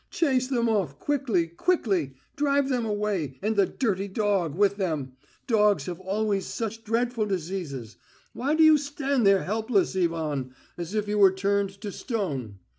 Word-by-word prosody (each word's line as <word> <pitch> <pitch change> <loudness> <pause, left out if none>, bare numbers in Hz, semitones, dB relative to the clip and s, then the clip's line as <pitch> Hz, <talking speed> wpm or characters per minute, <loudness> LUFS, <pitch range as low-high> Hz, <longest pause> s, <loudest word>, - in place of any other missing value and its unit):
Chase 260 -6 +1
them 240 -3 +1
off, 190 -11 0
quickly, 250 - 0
quickly. 180 - 0 0.2
Drive 280 -1 +1
them 250 -3 0
away, 205 - -2
and 220 +1 +1
the 200 -2 +4
dirty 200 -6 -1
dog 195 -6 0
with 200 +1 +2
them. 155 -9 -2 0.3
Dogs 210 - +3
have 175 -1 -5
always 195 +1 -1
such 225 0 -4
dreadful 230 0 0
diseases. 165 - -4 0.4
Why 280 +5 0
do 320 - +5
you 310 -1 +7
stand 280 -4 0
there 195 -1 +4
helplessly, 205 -3 +1
Ivan, 150 -6 -3 0.2
as 175 +4 -6
if 210 -1 0
you 210 0 0
were 195 -2 +7
turned 195 0 -1
to 210 -2 -5
stone? 145 - -4
200 Hz, 160 wpm, -26 LUFS, 180-230 Hz, 0.4 s, you